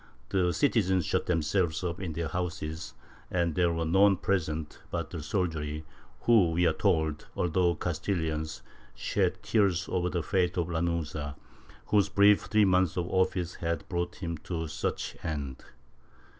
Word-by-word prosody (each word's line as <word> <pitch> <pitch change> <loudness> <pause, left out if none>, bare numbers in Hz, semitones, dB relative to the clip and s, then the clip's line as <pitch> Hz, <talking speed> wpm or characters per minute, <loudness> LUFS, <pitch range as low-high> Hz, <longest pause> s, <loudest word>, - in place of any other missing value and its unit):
The 90 -3 +2
citizens 95 - +2
shut - - 0
themselves 85 0 +1
up 85 -1 -2
in 90 -4 -4
their 80 0 -2
houses 85 -2 -4 0.3
and 85 -2 +1
there 85 0 +2
were 85 0 -1
none 95 +3 +5
present 80 -5 -2
but 85 -2 -3
the 85 - -5
soldiery 75 -3 -2 0.4
who, 110 -8 +5
we 85 +2 +2
are 80 - +4
told, 80 -4 0
although 90 0 +2
Castilians, 80 -2 -2 0.3
shed - - 0
tears 95 -5 +2
over 90 -1 0
the 85 -2 -2
fate 90 0 +1
of 85 -1 0
Lanuza, 80 -3 -2 0.5
whose 100 -1 +3
brief 100 +1 +5
three 105 0 +4
months 95 -2 +2
of 90 -1 0
office 90 -2 +1
had 85 -2 -3
brought 85 0 -2
him 85 -3 -4
to 80 0 -4
such 75 - -3
end. 70 -4 -4
85 Hz, 150 wpm, -29 LUFS, 80-95 Hz, 0.5 s, none